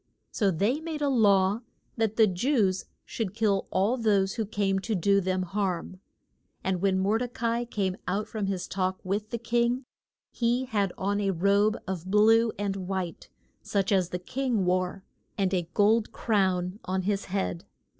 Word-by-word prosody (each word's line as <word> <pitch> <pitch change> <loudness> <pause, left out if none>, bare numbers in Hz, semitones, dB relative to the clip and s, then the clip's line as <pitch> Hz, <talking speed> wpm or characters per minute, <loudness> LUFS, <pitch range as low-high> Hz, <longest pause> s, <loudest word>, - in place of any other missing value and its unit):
So 205 -4 +1
they 205 - +1
made 315 -2 -4
a 285 - +2
law 205 -4 +3 0.3
that 225 -2 0
the 225 - +6
Jews 195 -1 +1 0.2
should 210 -4 -4
kill 210 -3 +1
all 205 +7 +1
those 200 -4 +2
who 225 -4 -2
came 200 -2 0
to 215 +3 -2
do 200 +2 +3
them 185 0 0
harm. 185 -1 -3 0.6
And 185 -2 -1
when 190 -1 +2
Mor 200 +4 +2
de 250 - -1
ca 230 -1 -2
i 235 +1 -1
came 195 -5 -2
out 200 +4 -1
from 210 -3 -3
his 190 -2 -2
talk 185 0 -1
with 205 +3 -2
the 235 - -2
king 235 +2 0 0.5
he 240 +2 0
had 205 -6 0
on 205 +2 0
a 200 - +1
robe 200 +4 +2
of 185 -1 -4
blue 225 +3 +5
and 200 -1 -2
white, 185 -3 -4 0.3
such 200 -1 -1
as 185 -3 +2
the 180 - -2
king 235 +2 -1
wore, 185 +1 0 0.3
and 195 -2 +1
a 175 -3 -1
gold 215 +2 +3
crown 190 -3 0
on 185 0 -2
his 200 +1 -1
head. 185 -2 -2
200 Hz, 175 wpm, -27 LUFS, 190-225 Hz, 0.6 s, the